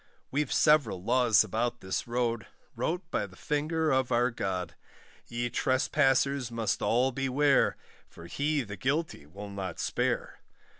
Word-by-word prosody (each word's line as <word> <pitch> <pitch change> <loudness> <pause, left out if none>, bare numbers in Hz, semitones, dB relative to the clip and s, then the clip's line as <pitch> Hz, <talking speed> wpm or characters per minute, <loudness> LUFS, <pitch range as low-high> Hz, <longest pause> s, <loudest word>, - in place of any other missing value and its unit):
We've 145 0 -1
several 140 - +3
laws 120 -1 +4
about 115 +3 -2
this 95 +4 -3
road, 120 -2 -1 0.3
Wrote 175 +3 -1
by 105 - -1
the 95 - -16
finger 155 - -1
of 130 -1 +1
our 120 +1 +3
God; 90 -6 -3 0.5
Ye 120 +1 -2
trespassers 135 0 +2
must 115 -2 -1
all 125 +3 +2
beware, 135 +2 +2 0.3
For 85 - -13
He 145 - -1
the 105 -2 -8
guilty 135 - -2
will 100 +5 -9
not 95 -1 -5
spare. - - -1
125 Hz, 140 wpm, -29 LUFS, 105-140 Hz, 0.5 s, laws